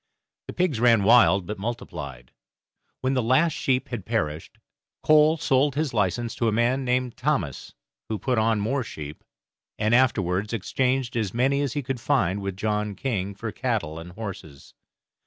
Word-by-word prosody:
The -, -, -6 dB
pigs 175 Hz, -10 st, 0 dB
ran 115 Hz, -3 st, +4 dB
wild, 100 Hz, -4 st, +5 dB
but 105 Hz, +2 st, -5 dB
multiplied. 80 Hz, -, -6 dB, 0.7 s
When 130 Hz, +1 st, 0 dB
the 130 Hz, -, +1 dB
last 130 Hz, +8 st, +3 dB
sheep 130 Hz, -3 st, 0 dB
had 120 Hz, -6 st, -4 dB
perished, 80 Hz, -8 st, -3 dB, 0.5 s
Cole 155 Hz, +1 st, +5 dB
sold 140 Hz, -2 st, +2 dB
his 150 Hz, -3 st, -1 dB
license 115 Hz, +3 st, 0 dB
to 115 Hz, -, +1 dB
a -, -, +2 dB
man 120 Hz, +5 st, +1 dB
named 125 Hz, -1 st, -1 dB
Thomas, 130 Hz, -, -2 dB, 0.3 s
who 110 Hz, -, -1 dB
put 125 Hz, +1 st, 0 dB
on 110 Hz, -1 st, +2 dB
more 130 Hz, +6 st, -1 dB
sheep, 75 Hz, -7 st, -8 dB, 0.5 s
and 110 Hz, +1 st, +1 dB
afterwards 105 Hz, -5 st, +2 dB
exchanged 125 Hz, +4 st, -1 dB
as 110 Hz, -3 st, -2 dB
many 135 Hz, +3 st, +2 dB
as 140 Hz, -3 st, -1 dB
he 145 Hz, -1 st, -2 dB
could 130 Hz, 0 st, -3 dB
find 100 Hz, -9 st, +1 dB
with 100 Hz, -1 st, -4 dB
John 105 Hz, 0 st, -1 dB
King 100 Hz, -4 st, -3 dB
for 110 Hz, +1 st, -5 dB
cattle 100 Hz, -, -2 dB
and 85 Hz, +2 st, -10 dB
horses. 95 Hz, -9 st, -9 dB
115 Hz, 165 wpm, -25 LUFS, 100-130 Hz, 0.7 s, wild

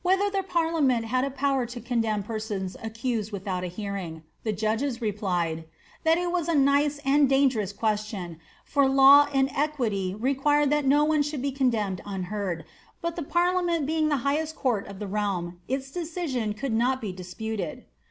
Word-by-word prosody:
ther 385 Hz, +2 st, +2 dB
the 390 Hz, -1 st, 0 dB
parliament 325 Hz, -10 st, +1 dB
had 255 Hz, +3 st, 0 dB
a 275 Hz, -, 0 dB
power 275 Hz, -1 st, 0 dB
to 240 Hz, +1 st, -6 dB
condemn 225 Hz, -3 st, -1 dB
persons 210 Hz, -3 st, -4 dB
accused 225 Hz, -1 st, -3 dB
withon 185 Hz, -2 st, -3 dB
hearing.'' 180 Hz, -4 st, -5 dB, 0.2 s
The 220 Hz, -, 0 dB
judges 225 Hz, +5 st, -1 dB
replied,' 180 Hz, -7 st, -1 dB, 0.4 s
^Tliat 325 Hz, 0 st, +4 dB
it 350 Hz, -, -1 dB
was 345 Hz, -2 st, -1 dB
a 335 Hz, -, +1 dB
nice 285 Hz, +1 st, +3 dB
and 280 Hz, 0 st, +4 dB
dangen 255 Hz, -8 st, +2 dB
question, 210 Hz, -6 st, -2 dB, 0.3 s
for 280 Hz, -2 st, +3 dB
law 275 Hz, +2 st, +8 dB
and 270 Hz, -1 st, +2 dB
equity 230 Hz, -11 st, -1 dB
required 275 Hz, +5 st, +2 dB
that 295 Hz, -2 st, +2 dB
no 290 Hz, +2 st, +5 dB
one 305 Hz, 0 st, +3 dB
should 290 Hz, -2 st, -2 dB
be 280 Hz, -, 0 dB
coodeou 230 Hz, -8 st, 0 dB
unheard; 190 Hz, -4 st, -4 dB, 0.3 s
but 335 Hz, 0 st, -3 dB
the 345 Hz, -, -3 dB
parliament 345 Hz, 0 st, +1 dB
being 310 Hz, +1 st, +1 dB
the 290 Hz, -, +2 dB
highest 310 Hz, +3 st, 0 dB
court 240 Hz, -10 st, 0 dB
of 200 Hz, -1 st, -9 dB
the 210 Hz, -, -5 dB
realm, 190 Hz, -4 st, -2 dB
decision 270 Hz, -, -3 dB
could 255 Hz, +2 st, -3 dB
not 250 Hz, +3 st, +2 dB
be 215 Hz, -6 st, -4 dB
disputed." 190 Hz, +4 st, -5 dB
250 Hz, 165 wpm, -26 LUFS, 205-290 Hz, 0.4 s, law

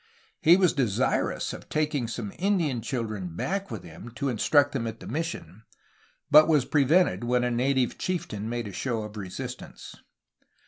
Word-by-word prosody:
He 170 Hz, +3 st, +7 dB
was 185 Hz, -3 st, +3 dB
desirousof 120 Hz, -9 st, -1 dB
taking 150 Hz, -5 st, 0 dB
some 115 Hz, -3 st, -5 dB
Indian 175 Hz, -, +1 dB
children 110 Hz, -, -4 dB
back 195 Hz, -, -2 dB
with 110 Hz, -6 st, -6 dB
him, 85 Hz, +7 st, -10 dB
to 140 Hz, -1 st, -1 dB
instruct 145 Hz, +5 st, +3 dB
them 120 Hz, -5 st, -2 dB
at 115 Hz, 0 st, -6 dB
themission, 155 Hz, -, -5 dB, 0.7 s
but 155 Hz, 0 st, +8 dB
was 150 Hz, -5 st, +3 dB
prevented 145 Hz, -, +3 dB
when 125 Hz, +1 st, +1 dB
a 125 Hz, -, 0 dB
native 125 Hz, +1 st, +1 dB
chieftain 115 Hz, -, -3 dB
made 120 Hz, -2 st, -3 dB
a 100 Hz, -, -8 dB
show 115 Hz, -2 st, -2 dB
of 105 Hz, 0 st, -9 dB
resistance. 95 Hz, -4 st, -7 dB
125 Hz, 150 wpm, -27 LUFS, 110-150 Hz, 0.7 s, but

